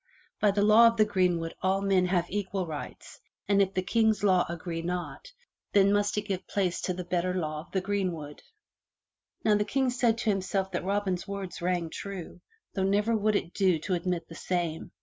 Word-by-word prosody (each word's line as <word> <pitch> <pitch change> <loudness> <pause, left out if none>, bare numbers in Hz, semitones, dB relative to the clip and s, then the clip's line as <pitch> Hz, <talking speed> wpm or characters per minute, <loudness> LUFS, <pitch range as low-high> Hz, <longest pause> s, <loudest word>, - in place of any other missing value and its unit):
By 210 - +4
the 200 0 +2
law 215 +3 +7
of 230 0 +1
the 215 - +5
greenwood 180 -5 0
all 190 +1 +2
men 195 -2 +2
have 180 -2 +1
equal 195 -1 -2
rights 155 -3 -8 0.3
and 200 0 +4
if 195 0 0
the 185 - 0
King's 220 0 +2
law 185 -3 +4
agree 170 0 -4
not, 180 - -5 0.4
then 200 0 +5
must 205 0 +1
it 210 - 0
give 195 -3 -4
place 185 -4 -1
to 185 - -1
the 180 - -4
better 180 +1 -1
law 155 -4 -2
of 160 - -12
the 190 - 0
greenwood." 180 -7 -3 1.0
Now 215 - +5
the 210 0 +3
King 265 +3 0
said 240 -2 +2
to 225 -1 +1
himself 190 0 -1
that 180 - -2
Robin's 195 -2 -1
words 195 -3 -6
rang 175 -2 -1
true, 190 -3 -7 0.3
though 195 - -2
never 205 +4 +2
would 215 0 +1
it 175 -3 -2
do 185 -4 +3
to 170 +4 -3
admit 175 -1 -2
the - - -11
same. 170 -1 -3
190 Hz, 200 wpm, -28 LUFS, 175-205 Hz, 1.0 s, law